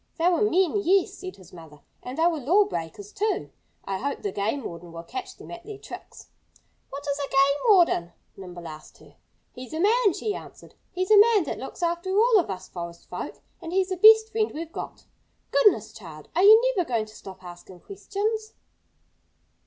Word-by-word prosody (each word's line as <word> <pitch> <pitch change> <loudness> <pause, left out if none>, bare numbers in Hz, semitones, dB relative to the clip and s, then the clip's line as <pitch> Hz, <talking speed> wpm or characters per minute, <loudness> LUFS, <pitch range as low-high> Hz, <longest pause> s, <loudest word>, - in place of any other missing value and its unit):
"They 335 +1 +2
were 345 - +1
men 380 -3 +2
yes!" 385 +2 +2
said 375 -1 -8
his 185 -1 -17
mother. 160 -4 -13 0.2
"And 250 +2 -8
they 325 - +2
were 335 -3 +1
lawbreakers, 245 - 0
too. 425 +1 -2 0.3
I 195 -1 -3
hope 280 0 -4
the 200 - -2
game 220 +8 -2
warden 170 -2 -8
will 165 0 -8
catch 375 - -7
them - - -12
at 345 0 -9
their 420 +1 -9
tricks." - - -12 0.6
"What 280 +1 -8
is 285 0 -1
a 280 - -3
game 275 +1 +3
warden?" 340 - +4 0.2
Nimble 175 -3 -9
asked 155 -1 -11
her. - - -19 0.4
"He's 255 +3 -10
a - - -3
man," 420 +1 +3
she 425 +4 -3
answered. - - -11 0.2
"He's 370 +2 -2
a 420 - +8
man 430 -2 +5
that 290 - -5
looks 265 +6 -7
after 345 +2 -1
all 455 0 +5
of 345 - -2
us 185 -1 -6
forest 170 -1 -8
folk - - -7 0.2
and 335 -1 -7
he's 380 +1 +1
the 375 - -1
best 440 +3 +7
friend 440 -1 0
we've 325 +1 -6
got.... - - -8 0.5
Goodness, 280 - +3
child! 165 -8 -12
Are 355 - +3
you 445 +5 +7
never 360 -4 0
going 230 -3 0
to 215 0 -16
stop 190 -1 -12
asking 175 +1 -12
questions?" 425 +2 -4
330 Hz, 195 wpm, -25 LUFS, -, 0.6 s, a